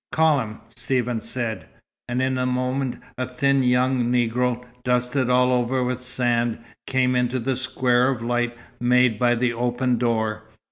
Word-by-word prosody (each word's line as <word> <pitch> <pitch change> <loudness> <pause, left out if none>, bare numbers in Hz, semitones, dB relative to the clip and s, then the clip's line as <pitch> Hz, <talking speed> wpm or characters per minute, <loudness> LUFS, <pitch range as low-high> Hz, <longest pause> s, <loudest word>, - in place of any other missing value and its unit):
"Call 160 -2 +3
him," 110 -3 -6
Stephen 125 -3 -1
said. 120 -3 -4 0.4
And 125 +1 0
in 130 0 0
a 125 - 0
moment 125 +1 -1 0.2
a 130 - -1
thin 135 +2 +1
young 125 0 +2
Negro, 125 0 0 0.2
dusted 125 +1 0
all 125 0 +4
over 125 +1 +1
with 125 0 -2
sand, 120 -2 0 0.3
came 130 -1 +1
into 125 +1 +1
the 130 +2 -1
square 125 -1 +1
of 125 -4 -2
light 120 0 -1 0.2
made 125 -2 +3
by 120 -1 +3
the 120 0 0
open 120 +1 0
door. 110 -2 -1
125 Hz, 155 wpm, -23 LUFS, 120-130 Hz, 0.4 s, all